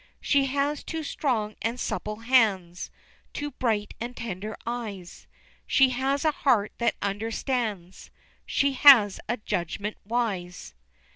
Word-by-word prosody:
She 280 -1 +2
has 285 +2 -1
two 320 -1 -4
strong 230 -8 -2
and 235 +2 -2
supple 215 -2 -4
hands, 205 -8 +2 0.4
Two 290 0 -4
bright 220 -5 -1
and 240 +1 -5
tender 215 -1 -5
eyes, 215 -7 -6 0.4
She 270 -1 +5
has 270 +4 -1
a 310 - +4
heart 240 -8 +1
that 235 -2 +1
understands, 210 -2 -3 0.3
She 280 0 +1
has 250 -8 +7
a 240 - 0
judgment 205 0 -3
wise. 195 - -3
230 Hz, 125 wpm, -26 LUFS, 205-265 Hz, 0.4 s, has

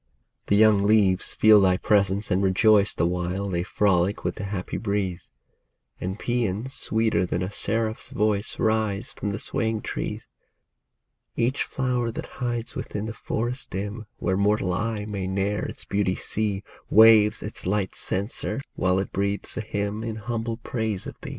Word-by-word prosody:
The 100 - +3
young 105 -1 +5
leaves 100 -2 +3
feel 110 -1 +7
thy 90 -1 +4
presence 100 0 +1
and 95 - +2
rejoice 100 +2 +4
The 85 - +1
while 90 +3 -1
they 85 -2 0
frolic 95 0 +1
with - - -1
the 100 - -4
happy 95 -2 -4
breeze; 100 -4 -2 0.7
And 95 +2 -3
paeans 120 +1 -1
sweeter 110 -5 +1
than 90 0 -1
a 95 - -4
seraph's 110 +2 0
voice 105 0 0
Rise 110 -3 0
from 105 - -3
the 100 - -3
swaying 110 -4 -1
trees. - - -4 1.1
Each 125 +4 0
flower 125 -3 -1
that - - -5 0.2
hides 120 -1 -2
within 105 0 -4
the 110 - -4
forest 120 +3 -3
dim. 105 +4 -5
Where 95 +2 0
mortal 100 -2 +2
eye 105 +1 -2
may 100 -3 -4
ne'er 100 +2 -1
its - - -7
beauty 100 -2 0
see, 105 -2 -2 0.3
Waves 110 -1 +6
its 105 -3 -7
light 100 -1 0
censer, 100 +7 -3 0.2
while 90 0 +1
it 95 - -2
breathes 100 +1 -2
a - - -2
hymn 105 0 -3
In 115 -1 -3
humble 115 +1 -3
praise 110 -4 -3
of - - -6
thee. - - -6
105 Hz, 165 wpm, -25 LUFS, 95-110 Hz, 1.1 s, feel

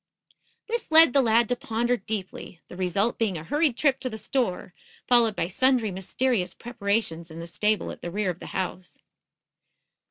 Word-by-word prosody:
This 470 0 -3
led 320 -4 +7
the 275 - +5
lad 230 -1 +3
to 245 - +1
ponder 240 +1 -1
deeply, 195 -4 -6
the - - -10
result 190 +5 0
being 210 -6 0
a 155 - -7
hurried 290 - +1
trip 275 -3 +2
to 260 - -4
the 220 - -7
store, 215 -7 -2 0.3
followed 235 -4 +4
by 165 - -1
sundry 235 +3 +1
mysterious 195 +2 -1
preparations 200 -8 -2
in 160 +1 -9
the 165 - -6
stable 210 +5 -1
at - - -11
the 175 - -5
rear 195 +1 -1
of 175 - -11
the - - -9
house. 185 -1 -5
220 Hz, 180 wpm, -26 LUFS, 185-245 Hz, 0.3 s, led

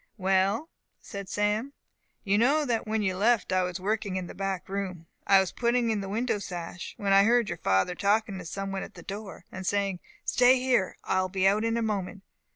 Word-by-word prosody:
"Well," 195 - +1 0.3
said 200 -2 -8
Sam, 210 +6 0 0.5
"you 200 0 +2
know 280 +8 +3
that 230 -4 -1
when 220 0 0
you 190 -2 0
left 215 0 +2
I 185 - +3
was 180 0 -2
working 205 0 -1
in 185 -1 -2
the - - -9
back 195 -1 -3
room. 190 -4 -4 0.2
I 195 -1 +7
was 190 -1 0
putting 235 -1 +1
in 210 -2 -1
the 195 - -5
window 225 +1 0
sash, 175 -2 -6
when 200 -1 +1
I 195 - +8
heard 235 0 +3
your - - -4
father 95 - +2
talking 200 +1 +1
to 180 - -8
some 195 +3 -4
one 195 0 -3
at - - -9
the - - -11
door, 205 0 -8
and 185 - -6
saying, 195 -1 0 0.3
'Stay 250 +1 +5
here, 250 -7 +1
I 185 - +1
will 185 - -2
be 190 0 +2
out 205 +3 +3
in 230 0 +1
a 230 - 0
moment! 200 -2 -3
200 Hz, 220 wpm, -28 LUFS, 190-225 Hz, 0.5 s, I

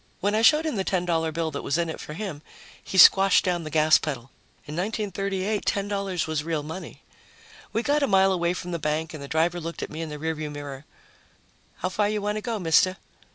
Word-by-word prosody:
When 205 +2 0
I 215 - +2
showed 300 +7 +5
him 305 -8 -2
the 190 - 0
$10 185 -2 -1 0.3
bill 160 0 -2
that 140 - -4
was 140 - -1
in 170 -1 0
it 160 - -6
for 150 - -8
him, 180 -6 -5 0.4
he 190 - -5
squashed 195 +2 +7
down 175 -2 0
the 155 - -6
gas 155 0 +5
pedal. 135 -5 -5 0.3
In 150 +1 -7
1938, 200 +1 -2
$10 200 -3 -1
was 155 -1 -2
real 160 -2 -2
money. 160 +5 -8 0.7
We 225 - -1
got 290 +2 +2
a 280 - +2
mile 195 -1 +4
away 175 -1 0
from 180 0 -6
the 170 - -2
bank 155 +2 -2
and 155 - -7
the 140 - -7
driver 165 +4 +1
looked 165 +1 -5
at - - -6
me 155 +1 -5
in 165 - -4
the 150 - -6
rear 160 +2 -2
view 155 -1 -5
mirror. 145 -1 -8 1.0
"How - - +1
far 205 +2 0
you 210 0 -1
want 210 +1 -2
to - - -3
go, 230 0 -3
mister?" 185 +1 +3
175 Hz, 230 wpm, -25 LUFS, 155-200 Hz, 1.0 s, squashed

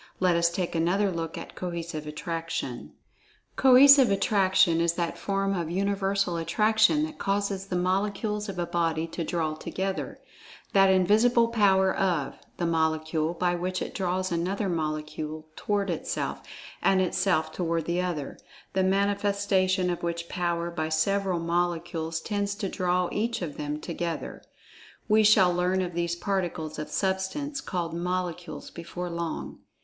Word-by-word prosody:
Let 180 -2 +3
us 170 0 +3
take 175 0 -3
another 180 +5 +1
look 165 -2 -4
at - - -8
Cohesive 170 -3 -5
Attraction.[Pg 165 -4 -4 0.6
55] - - -40
Cohesive 270 0 +8
Attraction 190 -3 +3
is 170 0 +2
that 170 -1 -2
form 195 0 -1
of 170 -3 -2
Universal 195 -1 0
Attraction 220 - +3
that 310 -1 -5
causes 200 -1 -1
the 185 - -3
Molecules 205 +3 -1
of 190 - -6
a 175 - -1
body 165 -2 0
to 165 +1 -5
draw 160 -2 -1
together—that 190 +2 -2
"invisible 220 +6 +4
power 195 -4 +3
of" 175 -7 0 0.2
the 175 - -1
Molecule, 160 0 0
by 175 +1 +1
which 180 +1 -2
it - - -5
draws 185 0 -1
another 185 +4 -1
Molecule 155 -1 -3
toward 200 -2 -1
itself, 165 - -3 0.4
and 190 - +3
itself 180 -3 +1
toward 165 -2 -1
the 175 +2 0
other, 170 -6 -4 0.3
the 190 - +2
manifestation 195 -1 +1
of 175 - -4
which 170 0 -3
power 170 -1 -2
by 160 -2 -2
several 185 +3 +1
Molecules 170 -1 -1
tends 205 0 -2
to 205 -1 -3
draw 180 -1 0
each 225 -1 -1
of 150 -4 -5
them 150 0 -4
together. 170 +1 -4 0.7
(We 215 0 +5
shall 205 -4 +5
learn 180 +2 +1
of 175 -1 -5
these 170 0 -1
particles 175 -5 -3
of 150 0 -5
Substance 195 - -2
called 170 -3 -3
Molecules 180 0 -4
before 175 +1 -6
long.) 170 -1 -4
180 Hz, 145 wpm, -27 LUFS, 170-195 Hz, 0.7 s, Cohesive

